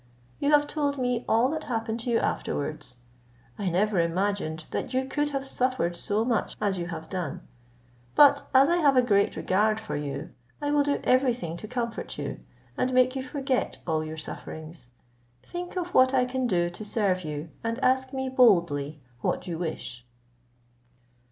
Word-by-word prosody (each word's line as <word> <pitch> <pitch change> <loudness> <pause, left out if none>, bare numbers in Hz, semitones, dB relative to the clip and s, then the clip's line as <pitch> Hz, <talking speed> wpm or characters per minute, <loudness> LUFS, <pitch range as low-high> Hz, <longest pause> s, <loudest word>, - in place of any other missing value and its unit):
You 285 - +1
have 295 -1 +5
told 290 -2 -1
me 250 -2 0
all 230 +3 +4
that 315 +1 -3
happened 225 -1 -2
to 235 - -4
you 235 - +3
afterwards. 150 - -2 0.6
I 195 -3 0
never 195 +2 +2
imagined 170 -2 -1
that 255 - -3
you 260 0 +1
could 295 +2 -1
have 275 -1 -3
suffered 255 -10 0
so 210 +5 0
much 235 -3 0
as 195 -3 0
you 170 - -3
have 160 -2 -6
done. 180 -7 -4 0.7
But 285 -1 +7
as 270 +1 +6
I 345 - +3
have 285 -6 +4
a 250 - +6
great 200 -4 +2
regard 215 +3 +2
for 220 - -5
you, 145 -1 -4 0.3
I 290 0 -1
will 295 0 +4
do 285 0 0
every 255 -1 +3
thing 170 -9 -5
to 215 - -8
comfort 235 -1 -4
you, - - -4 0.4
and 255 - 0
make 255 +1 +4
you 265 - -1
forget 265 0 -1
all 160 -2 0
your 155 0 -6
sufferings; 160 -1 -8 0.6
think 350 +1 -6
of 355 0 -3
what 260 +1 +5
I 250 -1 +4
can 255 0 -1
do 175 -4 +1
to 195 - -8
serve 200 -4 0
you, 150 +1 -5
and 230 0 -1
ask 260 0 +2
me 265 -1 -2
boldly 170 - +3 0.2
what 180 - -1
you 170 -3 -4
wish." 155 -7 -5
230 Hz, 180 wpm, -27 LUFS, 175-260 Hz, 0.7 s, But